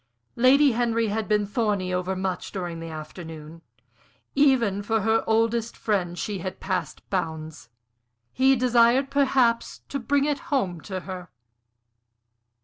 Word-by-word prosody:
Lady 270 +4 +5
Henry 230 -1 +1
had 215 +1 -2
been 210 -1 +2
thorny 200 -3 -1
over 180 +1 -1
much 185 -1 -3
during 175 -4 -4
the 165 0 -7
afternoon; 160 0 -9 0.7
even 255 -8 +3
for 220 +1 0
her 220 +2 +2
oldest 225 +1 +1
friend 180 -5 -1
she 200 +2 -3
had 185 +2 -6
passed 185 -4 -4
bounds; 160 - -4 0.6
he 265 +1 +4
desired 250 +2 +3
perhaps 260 -4 +2
to 280 - -3
bring 280 +3 +1
it 295 -1 0
home 185 - 0
to 190 +1 -5
her. 180 -1 -8
210 Hz, 135 wpm, -25 LUFS, 180-240 Hz, 0.7 s, Lady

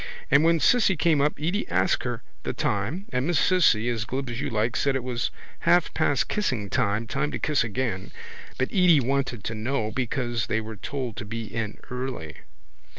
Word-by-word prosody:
And 140 +3 +6
when 165 0 +4
Cissy 195 - +4
came 155 -2 +3
up 150 +1 +2
Edy 175 +7 -1
asked 95 +6 +1
her 120 -1 -3 0.2
the - - -3
time 120 - -1
and 125 +3 0
Miss 175 -2 +2
Cissy, 150 - +4
as 115 -3 -1
glib 130 +2 -4
as 120 +3 -4
you 145 - -2
like, 115 0 0
said 140 -1 +1
it 135 - -1
was 120 -2 -1 0.3
half 175 0 +3
past 145 -4 +1
kissing 130 - -1
time, 110 -2 +1
time 135 +6 -1
to - - -3
kiss 150 -2 +1
again. 110 -3 -2 0.5
But 130 - 0
Edy 180 -5 +5
wanted 135 -3 -1
to 115 - -3
know 110 0 -2
because 120 -1 -1
they 110 - +1
were 110 0 -6
told 125 +2 -5
to - - -5
be 115 +2 -4
in 110 -1 -4
early. 125 - -5
125 Hz, 195 wpm, -26 LUFS, 110-145 Hz, 0.5 s, And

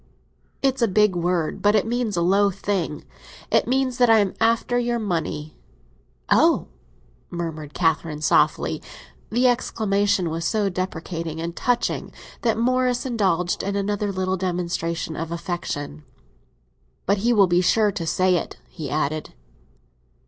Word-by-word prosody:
"It's 270 -1 +1
a 230 - +4
big 210 -1 +3
word; 175 -2 -1
but 205 +1 +4
it 210 - +3
means 230 -3 -1
a 170 - +2
low 200 +3 +4
thing. 190 -5 -3 0.5
It - - +3
means 255 0 0
that 245 -1 +5
I 225 - +7
am 200 -3 +2
after 230 +2 +2
your 240 0 0
money." 165 -7 -3 0.7
"Oh!" - - +3 0.6
murmured 160 -4 -5
Catherine 160 -2 0
softly. - - +2 0.5
The 245 +3 +3
exclamation 205 -7 +1
was 165 +1 -3
so 205 +2 +1
deprecating 170 -3 -4
and 170 +1 -4
touching 245 -1 -1 0.3
that 230 -2 +1
Morris 250 +2 +1
indulged 190 -8 0
in 200 +1 -2
another 205 0 -1
little 185 0 -1
demonstration 170 -3 -2
of 165 +1 -4
affection. 165 -4 -4 1.0
"But 200 +1 +2
he 235 +4 +2
will 205 -4 +6
be 175 0 +2
sure 210 +3 +3
to 170 -3 -4
say 185 +3 +3
it," - - -5
he 155 -5 -6
added. 155 +1 -2
190 Hz, 140 wpm, -23 LUFS, 170-220 Hz, 1.0 s, I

